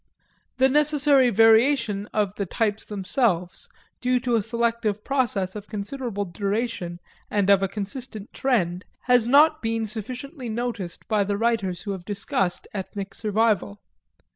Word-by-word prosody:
This 265 0 +4
necessary 290 -3 +4
variation 225 -1 +4
of 205 -3 -1
the 200 -2 -4
types 215 +2 -1
themselves, 195 -3 -1 0.3
due 250 0 +2
to 245 -1 -1
a 230 - +3
selective 230 -1 -1
process 220 -9 0
of 210 -1 -7
considerable 210 0 -4
duration 195 -1 -3 0.3
and 200 -1 +2
of 195 -1 +5
a 195 - +1
consistent 215 +2 -6
trend, 185 -9 0 0.2
has 245 -2 +3
not 310 +4 +5
been 225 0 -1
sufficiently 250 - -6
noticed 220 -6 -4
by 215 -2 +2
the 200 0 -2
writers 205 -6 0
who 205 - -4
have 190 -3 -5
discussed 195 -2 -2
ethnic 195 0 -5
survival. 210 - 0
215 Hz, 140 wpm, -24 LUFS, 195-245 Hz, 0.3 s, of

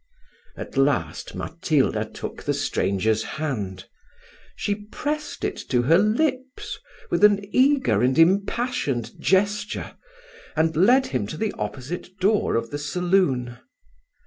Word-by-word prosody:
At - - -7
last 135 - 0
Matilda - - 0
took - - -8
the - - -1
stranger's 110 +3 0 0.2
hand: 100 -12 -3 0.7
she 205 - -1
pressed 300 +7 -4
it - - -2
to 125 -2 +2
her 165 +8 +5
lips 260 - -1 0.3
with - - +1
an 205 -1 +5
eager 265 - +3
and 130 +2 +2
impassioned 170 - +1
gesture, 205 +2 0 0.6
and 160 0 +1
led 245 - +5
him 120 -6 0
to 155 - -6
the 220 -1 -1
opposite 175 +7 -6
door 200 +3 +2
of 115 0 -2
the 145 - -3
saloon. 145 -6 0
175 Hz, 120 wpm, -24 LUFS, 125-210 Hz, 0.7 s, her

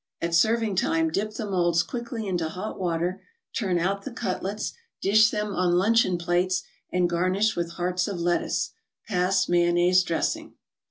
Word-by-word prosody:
At 170 0 -2
serving 220 +3 +2
time 165 -3 +1
dip 210 +5 -2
the 220 - -3
molds 175 -4 +2
quickly 235 0 -5
into 175 -4 -1
hot 185 +6 -6
water, 175 0 -1 0.3
turn 190 -6 0
out 195 +3 0
the - - -6
cutlets, 195 +3 -3 0.3
dish 215 +3 +5
them 210 -2 -2
on 180 -1 +1
luncheon 200 -1 +3
plates, 175 +1 0 0.3
and 180 -1 +2
garnish 185 +5 +1
with 170 -1 -3
hearts 180 +1 -1
of 195 -4 -4
lettuce. 175 0 0 0.4
Pass 190 -1 +1
mayonnaise 175 +1 +4
dressing. 170 -3 -2
185 Hz, 155 wpm, -26 LUFS, 175-205 Hz, 0.4 s, dish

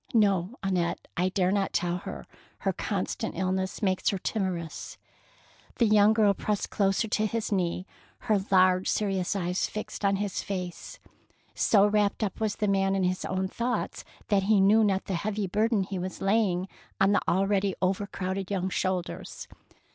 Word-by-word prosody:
" - - -20
No, 200 -1 +2
Annette, 180 -3 -1
I 180 +2 +1
dare 185 -1 +1
not 200 -1 0
tell 175 0 0
her; 65 - -7 0.4
her - - 0
constant - - -3
illness 190 +2 -1
makes 185 -2 +2
her 200 - -1
timorous." 185 -5 -3 0.8
The 235 - +4
young 210 -1 +5
girl 215 -2 +4
pressed 210 +1 -2
closer 195 +2 +1
to 215 +1 +1
his 225 +1 -3
knee, 180 -2 0 0.4
her 210 -5 +1
large, 185 -1 +4
serious 195 -2 0
eyes 180 -1 -1
flxed 215 0 -6
on 200 0 +3
his 200 -1 -2
face. 180 -3 -5 0.6
So 205 -2 +4
wrapped 210 +1 +1 0.2
was 215 -2 0
the 210 - -1
man 195 -1 +2
in 190 - +1
his 185 0 0
own 190 0 -1
thoughts 235 +5 -3 0.3
that 200 -2 +3
he 215 -2 +5
knew 210 +3 +5
not 195 -2 +1
the 195 - -3
heavy 205 +3 -1
burden 210 +2 +1
he 190 0 -4
was 185 +1 -5
laying 195 -3 +1 0.3
on 195 +1 +4
the 205 - +3
al 190 +3 +2
ready 195 -1 +1
overcrowded 190 0 -2
young 190 -2 -1
shoulders. 185 -1 -3
195 Hz, 170 wpm, -28 LUFS, 185-205 Hz, 0.8 s, young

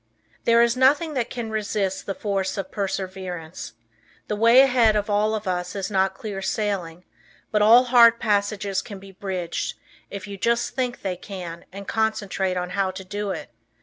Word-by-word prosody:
There 235 0 +5
is 235 0 +2
nothing 285 +5 +3
that 245 -4 -1
can 235 -3 -5
resist 205 -3 -2
the 195 - -2
force 195 -2 -2
of 190 -1 -4
perseverance. 185 - -5 0.6
The 210 - 0
way 230 +4 +7
ahead 245 -5 +4
of 210 0 -1
all 210 +1 +2
of 215 -2 -5
us 180 +1 -2
is 195 0 -3
not 190 -1 +1
clear 200 -1 -6
sailing, 185 -5 -2 0.5
but 210 - +2
all 230 +4 +7
hard 235 -2 +6
passages 205 -2 0
can 205 -4 -9
be 195 0 -13
bridged, 185 -3 -4 0.3
if 200 -1 -7
you 200 -1 -7
just 235 +4 0
think 250 -2 -3
they 185 -2 -2
can 175 -3 -8
and 200 +1 -9
concentrate 205 -4 -1
on 180 0 -3
how 195 -1 0
to 190 +1 -7
do 205 +2 -4
it. 190 - -5
200 Hz, 180 wpm, -24 LUFS, 190-225 Hz, 0.6 s, way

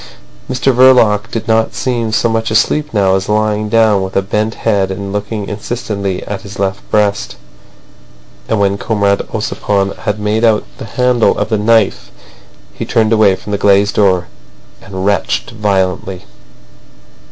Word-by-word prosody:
Mr 130 +1 +1
Verloc 115 -4 +4
did 115 0 -5
not 110 0 +1
seem 120 -4 -1
so 110 +2 +1
much 115 0 -1
asleep 150 +7 +1
now 95 -3 +2
as 95 +1 -2
lying 105 0 0
down 110 -3 +3
with 95 0 -5
a 100 - +2
bent 105 +2 -1
head 100 -4 0
and 100 +1 -5
looking 105 0 -4
insistently 100 -3 -4
at 100 -1 -5
his 100 0 -10
left 95 0 -2
breast. 105 -1 0 1.1
And 110 - +1
when 100 0 +1
Comrade 100 -3 +1
Ossipon 100 -2 -1
had 105 -2 -3
made 105 +2 -1
out 110 -2 +3 0.2
the - - -6
handle 125 +2 +1
of - - -2
the 110 -2 0
knife 110 -1 +2 0.6
he - - -6
turned 110 0 +1
away 105 -3 +4
from 105 - -9
the 100 - -1
glazed 100 0 +3
door, 95 -4 +2 0.5
and 95 -1 -6
retched 100 +2 0
violently. 95 -3 -2
105 Hz, 155 wpm, -14 LUFS, 100-110 Hz, 1.1 s, Verloc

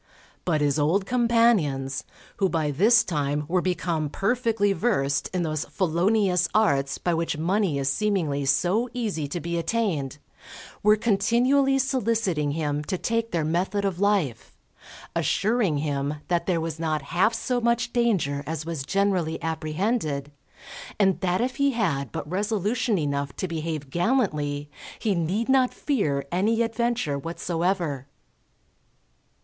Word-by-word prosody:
But 155 -4 +1
his 145 0 +1
old 170 +7 +2
companions, 220 - +2 0.3
who 195 -2 +2
by 155 -4 0
this 220 - +5
time 150 -2 -1
were 180 +2 +1
become 170 -4 -1
perfectly 220 - +1
versed 140 - 0
in 180 -2 -1
those 155 -2 -2
felonious 180 0 +1
arts 140 -11 +2
by 175 - -1
which 165 -1 -1
money 180 -1 +1
is 135 -1 -1
seemingly 155 -4 0
so 185 - +2
easy 205 -12 -2
to 160 +5 -4
be 170 0 -2
attained, 165 - -1 0.6
were 210 +1 +5
continually 240 +6 +2
soliciting 225 - 0
him 150 -2 -1
to 185 - -2
take 230 +3 -1
their 165 -6 -1
method 185 +5 0
of 185 -3 -2
life, 200 - 0 0.6
assuring 210 -6 +1
him 145 0 -1
that 170 -1 0
there 175 -3 +2
was 160 -1 -4
not 155 -3 -1
half 215 +6 +3
so 245 +2 -1
much 235 0 +1
danger 190 - +1
as 155 -1 -4
was 165 -4 -4
generally 185 -1 0
apprehended, 155 - -2 0.7
and 195 -2 +3
that 185 +1 +1
if 255 +1 -2
he 280 -1 +2
had 145 - -1
but - - -5
resolution 210 +4 0
enough 140 -3 -2
to 185 - -3
behave 155 -4 -4
gallantly, 155 - 0 0.3
he 215 -3 0
need 185 +6 -1
not 265 -1 +3
fear 155 - -1
any 215 +6 +2
adventure 230 -10 -1
whatsoever. 165 -3 -2
180 Hz, 140 wpm, -25 LUFS, 150-220 Hz, 0.7 s, this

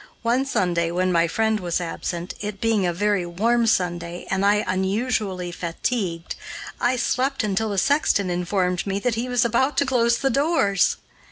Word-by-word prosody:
One 245 +4 +1
Sunday, 175 -8 +1
when 180 +2 0
my 170 -1 +3
friend 220 +4 +1
was 175 -2 -1
absent, 175 0 -4
it 205 -1 -5
being 220 -4 +1
a - - +1
very 205 +1 0
warm 225 +8 +1 0.3
day 170 +1 -8
and 190 0 +1
I 205 +1 +3
unusually 190 -1 -1
fatigued, 170 0 -3 0.5
I 245 +1 +2
slept 255 +2 0
until 215 +1 0
the 200 - -3
sexton 205 -7 +2
informed 180 +1 -1
me 195 0 -1
that 240 +4 0
he 235 +3 -3
was 245 -1 +2
about 260 +4 +1
to 280 - +3
close 235 -2 +2
the 270 - 0
doors! 275 - +2
205 Hz, 170 wpm, -23 LUFS, 180-240 Hz, 0.5 s, my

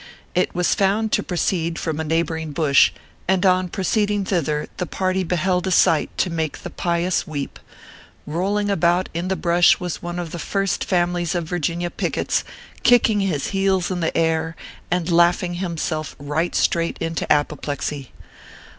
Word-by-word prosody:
It 180 - 0
was 180 0 +2
found 205 +3 +1
to - - +2
proceed 170 -2 -1
from 160 -2 -3
a - - -1
neighboring 160 -1 -1
bush, 145 -3 +4 0.4
and 190 +1 +2
on 185 -1 +3
proceeding 205 +1 0
thither 155 -6 -1
the 180 - -2
party 185 0 0
beheld 180 +1 0
a - - 0
sight 160 -3 +4
to 180 - +1
make 160 -2 -3
the - - -6
pious 170 +1 0
weep. 145 -3 -5 0.7
Kolling 200 +6 0
about 175 0 +2
in 170 +2 -2
the 190 - 0
brush 175 -1 +4
was 180 -2 -4
one 175 0 -5
of 175 -2 -4
the 175 - -5
First 195 +3 -1
Families 175 -1 0
of 175 - 0
Virginia 175 +1 -2
pickets, - - -1 0.4
kicking 235 -3 +4
his 180 -8 -1
heels 195 -2 +1
in 180 - -2
the 165 - -1
air, 160 0 +1 0.3
and 180 0 0
laughing 175 +1 +3
himself 160 -3 -3
right 150 +4 -2
straight 170 0 +1
into 165 0 -2
apoplexy. 145 -2 -1
175 Hz, 160 wpm, -22 LUFS, 160-185 Hz, 0.7 s, bush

